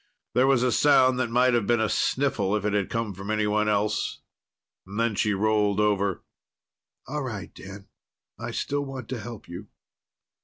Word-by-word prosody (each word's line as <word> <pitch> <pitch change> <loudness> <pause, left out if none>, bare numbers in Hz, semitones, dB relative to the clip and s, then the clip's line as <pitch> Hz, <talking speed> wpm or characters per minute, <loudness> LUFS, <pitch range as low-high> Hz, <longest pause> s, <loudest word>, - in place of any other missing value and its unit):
There 130 +2 +4
was 135 -3 +3
a 125 - +2
sound 130 -1 +4
that 125 -2 0
might 125 +2 +3
have 115 -4 +1
been 120 -1 +3
a 110 - +2
sniffle 115 -9 0
if 105 -1 -2
it 105 - 0
had 100 -2 0
come 115 -3 -2
from 95 +2 -8
anyone 105 0 +1
else. 105 0 0 0.6
Then 110 +4 -1
she 105 0 +1
rolled 105 0 +1
over. 100 -3 +1 0.8
"All 150 +3 -4
right, 110 -9 -6
Dan. 95 +1 -11 0.5
I - - -5
still 145 0 -2
want 135 -2 -7
to 130 - -3
help 115 -1 -9
you." 90 +4 -8
110 Hz, 170 wpm, -26 LUFS, 100-125 Hz, 0.8 s, There